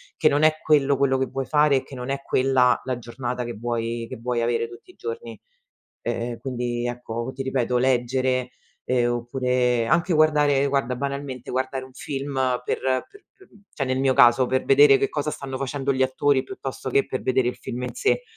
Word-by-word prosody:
che 155 - +3
non 145 +2 +1
è 155 0 +4
quello 145 -2 +3
quello 135 -1 +2
che 130 - +1
vuoi 135 +2 -4
fare 150 -2 +4
e - - -2
che 135 - -11
non 125 +1 -6
è 140 0 -2
quella 130 -2 +3
la 130 -2 -2
giornata 120 +1 -4
che 120 -2 -6
vuoi 115 0 -3
che - - -6
vuoi 120 -1 -1
avere 115 0 0
tutti 120 - -14
i - - -27
giorni. 460 +1 -6 0.6
Eh 120 0 -3
quindi 120 -2 -3
ecco, 120 0 -4
ti 135 - -4
ripeto 125 -2 0
leggere, 130 0 +1 0.3
ehm, 120 -1 +1
oppure 125 0 0
anche 170 +6 +2
guardare 150 -3 +3
guarda 135 -3 0
banalmente, 140 -2 -5
guardare 130 +1 -2
un 130 - -15
film 140 +1 -5 0.3
per - - -1 0.3
per 405 - -18
p 385 - -20 0.3
cioè 135 - -2
nel 130 0 0
mio 135 -1 +2
caso 120 +2 +6
per 130 +1 0
vedere 140 0 +7
che 135 - 0
cosa 150 0 -2
stanno 135 -3 -6
facendo 135 0 -1
gli 130 0 0
attori 130 +1 +2
piuttosto 130 0 -6
che 135 +2 +2
per 130 - -3
vedere 130 -1 +1
il - - -4
film 125 +1 -6
in 125 - -4
sé 440 +4 +1
130 Hz, 200 wpm, -24 LUFS, 125-140 Hz, 0.6 s, vedere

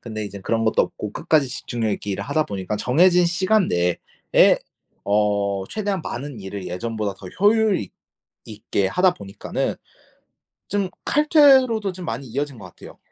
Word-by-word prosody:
근데 110 -2 -5
이젠 100 -1 -8
그런 115 -1 0
것도 - - +3
없고 105 -1 -6
끝까지 150 -5 +2
집중력 120 -3 -3
있게 100 - -5
일을 100 +1 -3
하다 150 +4 0
보니까 100 -2 -4
정해진 175 - +4
시간 185 +4 +2
내에 90 0 +2 0.5
어 100 -1 +1
최대한 200 -4 -2
많은 135 -3 -6
일을 95 -1 -7
예전보다 105 +2 -3
더 95 - -11
효율 215 -1 +4
있 95 - -7 0.5
있게 105 -2 -2
하다 180 - +3
보니까는 100 - -4 0.9
좀 200 -1 -1 0.2
칼퇴로도 265 - +4
좀 180 -1 -8
많이 130 +2 -5
이어진 135 0 -4
것 - - -10
같아요. - - -14
120 Hz, 325 characters per minute, -22 LUFS, -, 0.9 s, 정해진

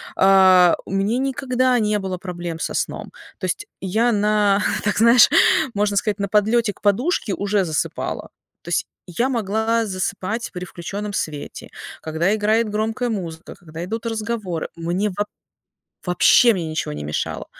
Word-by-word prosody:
А, 190 -2 +6
у - - -9
мне 200 +6 0
никогда 255 -2 +1
не 210 -1 +1
было 190 -2 -4
проблем 175 -2 -6
со - - -3
сном. - - -3 0.3
То - - -5
есть, 415 - -3
я 220 +6 +1
на, 210 -1 +2 0.2
так, 205 -1 0
знаешь, 235 +3 +7 0.5
можно 205 0 +1
сказать, 210 0 0
на 200 - -1
подлёте 215 +2 +2
к - - -26
подушке 215 - +1
уже 200 -1 0
засыпала. 155 -3 -3 0.3
То 170 - -9
есть, 175 - 0 0.2
я 215 +9 -1
могла 225 -1 0
засыпать 195 +3 -3
при 180 -1 -6
включенном 200 +4 -6
свете, 150 -5 -5 0.3
когда 160 +5 0
играет 220 +2 +1
громкая 220 +3 -1
музыка, 170 -6 -5
когда 165 0 -9
идут 225 +4 -5
разговоры. 215 -6 -3
Мне 175 +5 -1
воб 205 0 -1 0.8
вообще 210 +6 +5
мне 175 -5 -3
ничего 155 - -3
не 75 0 -6
мешало. 75 +1 -3
205 Hz, 155 wpm, -21 LUFS, 180-225 Hz, 0.8 s, знаешь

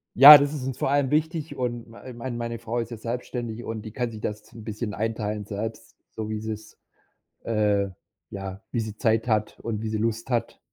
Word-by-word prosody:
Ja, 145 +4 +13
das 145 +1 0
ist 140 - -4
uns 130 -2 -3
vor - - 0
allem 140 -2 +2
wichtig 155 0 0
und 120 -3 -3
mei 115 - -13
äh, - - -7
mein 120 0 -5
meine 115 -1 -4
Frau 115 +1 -2
ist 115 - -3
ja 115 - -5
selbstständig 120 0 -4
und 110 -2 -5
die 110 - -7
kann 120 +1 -2
sich 110 -1 -9
das 105 0 -5
'n 115 - -10
bisschen 110 0 -4
einteilen 105 -1 -2
selbst, 110 +2 -5 0.2
so 110 -1 -5
wie 110 - -2
sie's 110 0 -6 0.7
äh, 105 -3 +2 0.4
ja, 95 -1 -6
wie 120 - -1
sie 110 -1 -5
Zeit 115 0 +2
hat 110 -2 0
und 110 -2 -3
wie 110 - -2
sie 110 - -1
Lust 115 +2 -1
hat. 120 -2 -1
115 Hz, 220 wpm, -26 LUFS, 110-120 Hz, 0.7 s, Ja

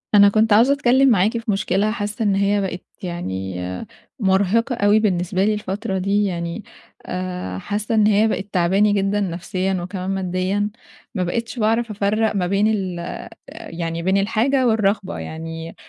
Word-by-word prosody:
أنا 200 0 +8
كنت 215 +1 +3
عاوزة 240 +6 +5
أتكلم 270 -1 +4
معاكِ 215 +1 +3
في 230 -2 -2
مشكلة 195 +1 +1
حاسة 215 0 -3
إن 200 -2 +2
هي 200 +1 +2
بقت 185 -2 -4 0.2
يعني 95 - -4 0.6
مرهِقة 200 +4 +2
أوي 210 -2 +4
بالنسبة 185 -3 0
لي 215 - +2
الفترة 205 0 -3
دي، 200 +2 +1
يعني 170 +2 -3 0.4
آآ 180 - -4
حاسة 210 - -2
إن 215 -1 +4
هي 215 +1 +4
بقِت 200 -2 -2
تاعباني 195 +4 +3
جدًا 200 0 +1
نفسيًا 185 +1 -2
وكمان 185 +1 -5
ماديًا، 190 +2 -1 0.5
ما 185 - 0
بقيتش 230 +6 -3
باعرف 225 +1 +1
أفرَّق 210 +2 0
ما 180 -3 0
بين 200 +3 +2
ال 190 -5 -1
آآ 170 - -5 0.5
يعني 165 0 -4
بين 190 +2 +2
الحاجة 230 +6 +2
والرغبة 205 - +1
يعني 165 - -7
200 Hz, 160 wpm, -21 LUFS, 180-215 Hz, 0.6 s, أنا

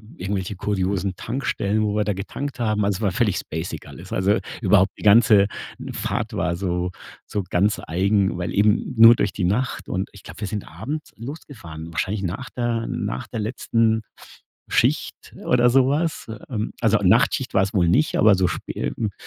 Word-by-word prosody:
irgendwelche 95 +1 -3
kuriosen 95 -1 -1
Tankstellen, 110 -3 -1
wo 105 -1 0
wir 105 - +2
da 105 0 -1
getankt 125 +9 -5
haben. 110 -3 +1
Also, 100 -2 0
es - - -10
war 100 -3 +1
völlig 105 -1 +1
spacig 80 +2 -5
alles. - - -10
Also, 100 +3 +2 0.2
überhaupt 95 -2 +4
die - - -10
ganze 105 -1 +6 0.4
Fahrt - - -3
war 85 -1 -1
so 90 -1 -2 0.3
so 105 - -3
ganz 100 +4 +1
eigen, 95 +3 +1
weil 90 -1 -3
eben 105 +5 +2
nur 115 +1 +9
durch 100 - -1
die 100 - -3
Nacht, 105 +9 -1
und 95 +2 -2
ich 100 - -13
glaube, 85 +5 -12
wir 105 - -2
sind 105 +1 -5
abends 150 +6 -6
losgefahren. 110 - -9
Wahrscheinlich 95 +5 -2
nach 95 +7 -4
der 120 -2 -1
nach - - -3
der 115 - -5
letzten 110 0 0 0.7
Schicht - - 0
oder 125 0 +4
sowas. 140 +6 +1
Äh, 110 -1 -7
ähm, 110 -1 -2
also, 110 -2 +3
Nachtschicht 120 +7 +3
war 95 - +5
es 100 +3 -3
wohl 90 -5 +3
nicht, 155 - +2
aber 105 -2 +6
so 95 -1 +2
spä 65 -7 -4
hm, 110 - -1
n - - -15
105 Hz, 185 wpm, -23 LUFS, 95-115 Hz, 0.7 s, nur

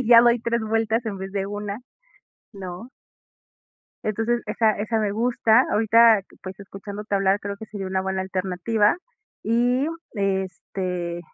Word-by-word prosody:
y 255 - -3
ya 235 -1 +10
doy 240 0 +4
3 235 0 0
vueltas 225 +1 0
en 200 -3 -3
vez 190 0 -6
de 195 -1 -1
una, 205 0 -4 0.8
¿no? 190 +3 -8 1.2
Entonces 225 +3 0
esa 220 +1 +2
esa 220 +2 -1
me 210 -2 0
gusta, 230 +2 +3
ahorita 225 0 +5 0.2
pues 190 0 -8
escuchándote 200 +1 -5
hablar 195 0 +2
creo 200 0 -5
que 220 - -8
sería 205 -3 -6
una 190 0 0
buena 190 0 -2
alternativa 190 - +1 0.5
y, 245 +5 +2 0.3
este, 185 -3 -2
205 Hz, 145 wpm, -24 LUFS, 190-225 Hz, 1.2 s, ya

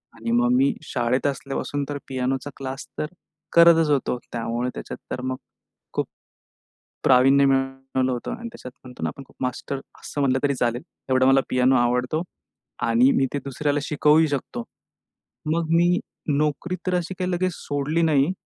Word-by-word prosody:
आणि 115 0 -4
मग, 120 +1 +3
मी 135 +2 +4
शाळेत 125 -1 0
असल्यापासून 140 +1 -3
तर 145 - -2
पियानोचा 130 +1 -2
क्लास 135 0 -6
तर - - 0 0.5
करतचं 165 -2 +6
होतो. 130 -2 0 0.2
त्यामुळे 120 +1 -2
त्याच्यात - - -7
तर 125 - -3
मग, 130 0 -2 0.6
खूप, - - -1 1.0
प्रावीण्य 135 +2 +6
मिळवलं 135 -1 0
होतं 120 - -4
आणि 235 0 -6
त्याच्यात 225 - -10
म्हणतो 125 -1 -11
ना, - - +1
आपण 140 - -11
खूप - - -23
मास्टर 130 +2 -3 0.2
असं 145 - -5
म्हटलं, 135 -2 +3
तरी 140 -1 +2
चालेल. 120 -1 0 0.3
एवढा 130 0 +4
मला 135 0 +6
पियानो 130 +1 +4
आवडतो 125 +5 +1 0.7
आणि 120 +3 +5
मी 135 - +2
ते - - +1
दुसऱ्याला 145 +2 -1
शिकवूही 150 +1 +4
शकतो. 130 -4 -3 0.9
मग, 170 0 0
मी 175 +2 +4 0.4
नोकरी 150 +4 -1
तर 185 - +1
अशी 180 +1 -1
काही 185 -1 -1
लगेच 185 +1 0
सोडली 145 +3 -1
नाही. 155 0 +3
135 Hz, 160 wpm, -24 LUFS, 125-150 Hz, 1.0 s, करतचं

